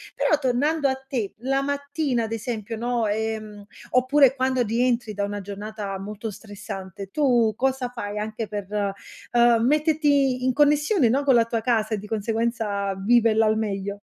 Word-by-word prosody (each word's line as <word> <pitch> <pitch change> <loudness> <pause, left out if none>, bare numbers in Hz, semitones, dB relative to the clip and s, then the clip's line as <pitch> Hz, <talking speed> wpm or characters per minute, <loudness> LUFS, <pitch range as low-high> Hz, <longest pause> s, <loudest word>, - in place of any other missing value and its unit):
Però 305 - +2
tornando 285 +3 +1
a 265 - +1
te, 265 -6 -4
la 270 +2 0
mattina 285 -2 -1
ad 220 - -5
esempio, 225 -1 -4
no, 240 0 -1
ehm, 215 -1 -3 0.3
oppure 260 +1 +4
quando 260 -1 +1
rientri 235 0 0
da 200 0 -1
una 205 0 -4
giornata 205 0 -6
molto 210 +2 -6
stressante, 195 -2 -8
tu 240 -6 +2
cosa 260 0 -1
fai 205 -4 -6
anche 215 +1 -4
per, 205 -1 -5 0.7
ehm, 235 -1 +4
metterti 290 -3 +2
in 255 - +2
connessione, 295 - +3
no, 270 +5 +1
con 270 -3 +4
la 230 -1 +4
tua 230 -1 -2
casa 220 -2 0
e - - 0
di 210 +1 -9
conseguenza 220 -2 -1
viverla 225 +2 +3
al 215 0 +2
meglio? 200 -2 -3
230 Hz, 160 wpm, -24 LUFS, 210-265 Hz, 0.7 s, oppure